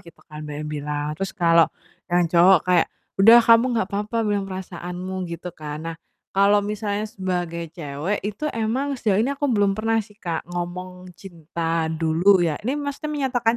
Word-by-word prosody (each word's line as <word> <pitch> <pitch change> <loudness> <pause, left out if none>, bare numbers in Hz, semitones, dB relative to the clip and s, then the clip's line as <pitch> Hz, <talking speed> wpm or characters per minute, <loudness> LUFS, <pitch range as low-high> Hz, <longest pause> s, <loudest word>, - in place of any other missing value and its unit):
gitu 170 -3 -17
kan 150 -2 -10
banyak 150 0 -5
yang 150 - -5
bilang. 145 0 -3
Terus 195 +2 -3
kalau 170 -3 +5 0.4
yang 175 0 +3
cowok 180 +2 +7
kayak, 180 -2 +3 0.3
"Udah 225 +4 +9
kamu 230 +1 +6
nggak 220 - +1
apa-apa 210 +3 -2
bilang 205 -2 -1
perasaanmu," 185 0 -5
gitu 170 +1 -6
kan. 150 -2 -7
Nah, 165 0 -5 0.4
kalau 200 +1 +4
misalnya 210 0 -2
sebagai 180 -5 -3
cewek 150 +5 -3
itu 210 +8 -4
emang 260 +6 -1
sejauh 210 -5 +1
ini 235 - +1
aku 285 +1 -1
belum 205 -2 +3
pernah 225 +1 +1
sih 210 0 -20
Kak 170 -6 -4
ngomong 180 +1 -6
cinta 165 -2 -3
dulu 165 +4 +3
ya, 160 -3 0
ini 250 - 0
maksudnya 285 +1 -4
menyatakan 250 -5 +1
185 Hz, 175 wpm, -23 LUFS, 170-210 Hz, 0.4 s, Udah